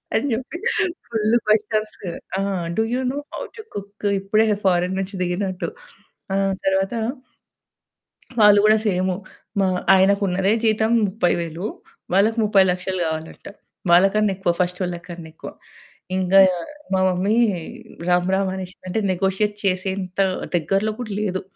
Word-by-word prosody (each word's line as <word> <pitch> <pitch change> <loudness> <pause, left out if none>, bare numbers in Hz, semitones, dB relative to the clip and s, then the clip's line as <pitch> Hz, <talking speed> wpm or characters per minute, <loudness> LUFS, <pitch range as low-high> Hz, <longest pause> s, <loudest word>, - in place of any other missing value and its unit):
అని 285 - +1
చెప్పి 260 +8 -4 0.5
full 220 0 +1
questions 215 0 +1 0.4
ఆ! - - -1 0.4
Do 220 - +3
you 255 - 0
know - - -5 0.2
how - - -5 0.2
to - - -6
cook? 205 +1 -8
ఇప్పుడే 215 +3 +2 0.2
ఫారిన్ 180 0 +2
నుంచి 195 +1 -4
దిగినట్టు. 180 0 -2 0.7
ఆ - - +1 0.3
తరువాత 195 +3 +1 1.5
వాళ్ళు 205 -1 +7
కూడా 215 0 +6
సేమ్ 185 -1 +1 0.5
మా 190 - +3 0.3
ఆయనకున్నదే 195 0 +3
జీతం 220 +1 +2 0.2
30000 175 -2 -1 0.5
వాళ్ళకి 220 +4 +3
3000000 190 -2 +2
కావాలి 160 0 -3
అంట. - - -20 0.4
వాళ్ళకన్నా 195 +3 +4
ఎక్కువ, 185 -3 +1
ఫస్టోళ్ళకన్నా 175 -2 -3
ఎక్కువ. - - -8 0.7
ఇంకా 190 +1 +4 0.6
మా 190 - +2
మమ్మీ 190 +5 +1 0.7
రామ్ 180 +1 +2
రామ్ 190 0 +1
అనేసింది. 185 -1 -8
అంటే 220 - 0
నెగోషియేట్ 195 +3 0
చేసేంత 190 0 -1 0.4
దగ్గరలో 195 +6 0
కూడా 220 -4 -5
లేదు. 185 -2 -2
195 Hz, 120 wpm, -22 LUFS, 180-210 Hz, 1.5 s, వాళ్ళు